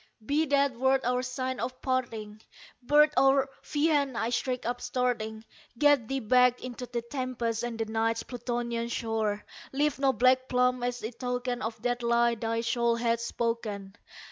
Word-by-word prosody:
"Be 305 +4 +1
that 280 -1 +3
word 265 +1 +3
our 250 +1 +1
sign 255 0 -3
of 255 +2 -4
parting, 225 -5 -3 0.4
bird 295 +4 +5
or 270 +1 +4
fiend!" 290 -4 +1
I 230 - 0
shrieked 250 +1 -2
upstarting 245 -2 -2 0.3
"Get 290 -4 +4
thee 270 +2 -1
back 250 +2 +4
into 250 0 -6
the 240 -1 -3
tempest 235 -3 -2
and 240 -1 -4
the 225 - -1
Night's 225 +1 0
Plutonian 240 -1 -3
shore! 220 -3 -2 0.3
Leave 290 +1 0
no 275 -1 +4
black 255 +2 +3
plume 250 0 +2
as 245 -1 -2
a 220 - -3
token 245 +1 -3
of 225 +1 -4
that 245 0 0
lie 235 0 +3
thy 230 0 -2
soul 235 0 +1
hath 230 0 +1
spoken! 225 -4 -3
245 Hz, 160 wpm, -29 LUFS, 230-255 Hz, 0.4 s, bird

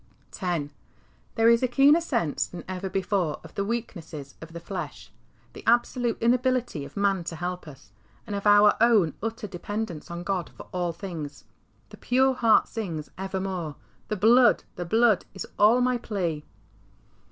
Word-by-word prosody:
X. 165 -6 -2 0.6
There 225 -1 +4
is 235 0 +5
a 255 - +2
keener 280 +6 +5
sense 235 - -1
than 180 - -9
ever 185 +1 -4
before 185 -4 -1
of 160 - -13
the 200 - -1
weakness 170 - -5
of 165 0 -10
the 170 - -7
flesh, 170 -4 -7 0.4
the - - -11
absolute 240 0 +2
inability 250 - +1
of 140 - -12
man 200 -3 +1
to 165 - -5
help 180 +1 -5
us, 135 -8 -13 0.3
and 205 - -4
of 200 +1 -2
our 205 0 +7
own 220 -9 +4
utter 225 0 -4
dependence 200 -3 -5
on 170 0 -5
God 185 -2 -2
for - - -8
all 175 -1 -1
things. 165 -4 -7 0.5
The - - -12
pure 260 +2 +2
heart 230 -3 +4
sings 170 -10 -5
evermore, 190 -5 -4 0.2
" - - -36
The 215 - -1
Blood, 235 +5 +5
the 175 - -4
Blood, 225 +2 +3
is 190 - -5
all 225 +4 +6
my 250 -1 +1
plea." 175 -10 -3
195 Hz, 165 wpm, -26 LUFS, 170-230 Hz, 0.6 s, our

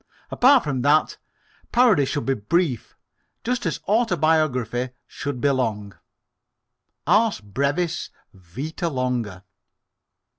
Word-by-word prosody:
Apart 260 +1 +5
from 135 -4 -2
that, 145 +4 +2 0.5
parody 235 - +4
should 145 +1 -3
be 135 - +1
brief, 135 - -1 0.5
just 245 -5 -1
as 165 - -2
autobiography 155 - +1 0.2
should 140 -3 -5
be 140 +3 +2
long 105 -6 -2 1.1
ars 220 0 +3
brevis, 140 - -2 0.2
vita 135 - -5
longa. 125 - -3
140 Hz, 100 wpm, -23 LUFS, 125-170 Hz, 1.1 s, Apart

